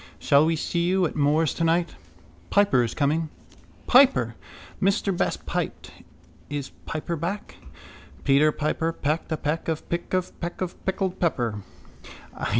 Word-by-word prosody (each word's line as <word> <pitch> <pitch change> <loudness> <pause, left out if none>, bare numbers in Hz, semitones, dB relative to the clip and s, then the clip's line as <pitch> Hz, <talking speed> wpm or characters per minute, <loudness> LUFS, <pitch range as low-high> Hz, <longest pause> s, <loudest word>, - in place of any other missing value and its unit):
Shall 140 +3 +4
we 165 - +2
see 170 +2 -1
you 185 0 +3
at - - -3
Moore's 150 +1 +2
tonight? 170 +1 +1 0.6
Piper 200 -12 +4
is 115 - -3
coming. 155 +2 +1 0.6
—Piper! 135 - +5 0.5
Mr 195 0 +2
Best - - -1
piped. - - -3 0.6
Is 145 -2 -4 0.2
Piper 160 +2 -3
back? 175 +6 -4 0.7
Peter 145 +2 +4
Piper 155 +2 -1
pecked 155 +2 -2
a 160 - 0
peck 150 +3 -2
of 160 -1 -2
pick 170 0 -3
of 185 -1 -2
peck 175 0 -4
of 180 -1 -4
pickled 190 -1 -1
pepper. 120 - 0
165 Hz, 140 wpm, -25 LUFS, 145-175 Hz, 0.7 s, Piper